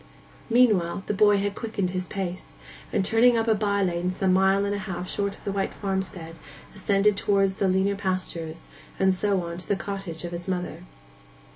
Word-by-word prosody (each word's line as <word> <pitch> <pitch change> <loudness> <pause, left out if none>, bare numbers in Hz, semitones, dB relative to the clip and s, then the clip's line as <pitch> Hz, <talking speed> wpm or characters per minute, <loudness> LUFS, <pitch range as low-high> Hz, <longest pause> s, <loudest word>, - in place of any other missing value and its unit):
Meanwhile 210 -7 +3
the - - -1
boy 205 0 +5
had 200 0 -1
quickened 200 -5 -3
his 185 0 -3
pace, 185 -2 -5 0.4
and 190 - +1
turning 235 +3 +5
up 225 0 0
a 225 - +5
by 200 -1 +1
lane 175 -1 0
some 185 0 +1
mile 190 +1 +3
and 200 0 -1
half 190 -3 -5
short 200 +1 -2
of - - -20
the 200 - -2
white 195 0 -2
farmstead, 190 -4 -4 0.4
ascended 200 +1 +2
towards 195 -1 +2
the 195 - +4
leaner 190 +2 +2
pastures, 185 -4 -3 0.3
and 190 0 +3
so 195 -1 +1
on 170 0 -6
to 180 - -8
the 200 - +2
cottage 195 -5 -5
of 175 - -5
his 175 +1 -6
mother. 180 - -3
195 Hz, 185 wpm, -26 LUFS, 180-200 Hz, 0.4 s, boy